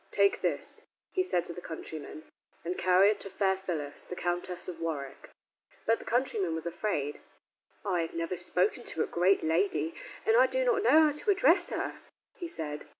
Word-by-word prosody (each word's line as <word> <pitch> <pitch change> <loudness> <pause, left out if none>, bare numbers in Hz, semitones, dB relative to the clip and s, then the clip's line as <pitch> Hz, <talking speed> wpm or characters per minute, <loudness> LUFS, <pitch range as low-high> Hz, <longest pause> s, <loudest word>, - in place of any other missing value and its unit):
"Take 200 0 +3
this," - - -2 0.3
he 375 - +1
said 180 - 0
to 170 - -3
the 175 - -8
countryman, 155 -2 -7 0.4
"and 175 +2 -2
carry 185 +3 +5
it 215 - -3
to 195 - -3
Fair 190 0 +1
Phyllis, 165 -7 -4
the 180 - -7
Countess 175 0 -3
of 175 -3 -6
Warwick." 150 -5 -5 0.6
But 225 +1 +3
the - - -11
countryman 220 -9 0
was 160 - -4
afraid. 170 -5 -2 0.7
"I 180 -4 +1
have 165 - -5
never 165 +2 -2
spoken 180 +1 0
to 160 - 0
a - - -1
great 185 +3 +2
lady, 160 -1 +1 0.3
and 450 - +4
I - - +6
do - - 0
not 485 -4 +3
know 320 -7 +6
how 305 - +4
to 300 +8 -3
address 360 -2 +5
her," - - -3 0.3
he 350 - -6
said. 150 - -5
180 Hz, 190 wpm, -30 LUFS, 165-220 Hz, 0.7 s, I